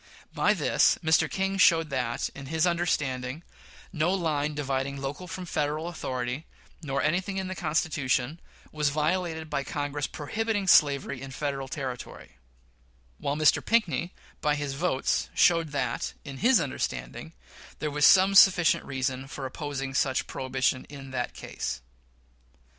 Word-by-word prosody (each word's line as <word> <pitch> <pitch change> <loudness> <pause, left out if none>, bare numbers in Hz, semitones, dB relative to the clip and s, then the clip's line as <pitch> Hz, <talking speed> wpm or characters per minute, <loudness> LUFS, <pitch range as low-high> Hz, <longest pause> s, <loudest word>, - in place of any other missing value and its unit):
By - - +3
this, - - +3
Mr. 160 -1 +3
King 195 0 -1
showed 165 -4 +5
that, 125 -3 -1
in 140 -1 -9
his 160 +3 +1
understanding, 150 -5 -1 0.5
no 165 +1 +1
line 155 -5 0
dividing 140 -1 -2
local 140 +7 -5
from 180 +1 -6
Federal 155 0 -2
authority, 130 -3 -4 0.3
nor 140 -3 -2
anything 185 +5 0
in 190 -1 -2
the - - -3
Constitution, 150 -4 -1 0.3
was 150 -1 +1
violated 160 +2 -1
by 145 -2 -2
Congress 145 0 -3
prohibiting 210 +6 -2
slavery 140 -6 +4
in 135 - -7
Federal 135 0 -3
territory; 130 -3 -7 0.8
while 140 - -1
Mr. 155 0 +3
Pinckney, 185 -6 +1 0.3
by 150 -1 +2
his 145 -2 -3
vote, 140 -2 0
showed 165 -2 +4
that 135 -5 -2
in 135 -1 -7
his 240 - +4
understanding 65 - -4 0.4
there 150 - -3
was 150 0 -1
some 190 +5 +7
sufficient 185 -4 +6
reason 130 0 -3
for 135 -1 -6
opposing 135 -1 -4
such 135 +1 +1
prohibition 130 0 -1
in 135 -2 -10
that 125 -2 -3
case. - - -5
145 Hz, 140 wpm, -27 LUFS, 135-170 Hz, 0.8 s, some